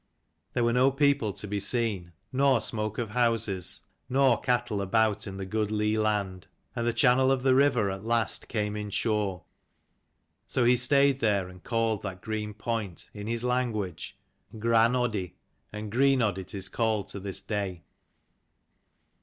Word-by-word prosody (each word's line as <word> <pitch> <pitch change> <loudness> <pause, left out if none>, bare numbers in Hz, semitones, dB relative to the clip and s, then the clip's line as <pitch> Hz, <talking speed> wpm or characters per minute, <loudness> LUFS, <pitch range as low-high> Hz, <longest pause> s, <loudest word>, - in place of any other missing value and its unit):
There 120 - +1
were 115 0 +2
no 125 +2 +4
people 140 -5 +2
to 105 - -4
be 100 0 -2
seen, 100 -5 0 0.2
nor 135 -1 +4
smoke 110 -1 -2
of 115 -4 -3
houses, 115 -6 0 0.3
nor 130 -3 +3
cattle 120 -4 0
about 110 +2 +1
in 95 -1 -6
the 95 - -4
good 105 +2 -1
lea 105 0 0
land. 100 -4 -1 0.3
And 120 -1 -1
the - - +3
channel 130 +1 +4
of 130 -1 0
the 130 -1 +4
river 130 -7 +3
at 95 +1 -6
last 115 -1 0
came 105 -2 -2
in 105 -1 -4
shore. 100 -4 -1 1.0
So 125 - 0
he 120 +1 +5
stayed 140 +2 +3
there, 100 -6 +1
and 90 0 -14
called 115 -3 0
that 95 -2 -6
green 105 -1 -4
point 110 -5 -4
in 105 0 -7
his 115 +1 -2
language 115 -9 -2 0.4
Gran 115 +1 +3
Oddi, 110 -8 -1 0.4
and 105 0 -6
Greenodd 125 -5 +2
it 95 - -7
is 95 -1 -2
called 110 -3 -1
to 100 - -5
this 95 0 -4
day. 100 -5 -3
110 Hz, 160 wpm, -28 LUFS, 100-120 Hz, 1.0 s, he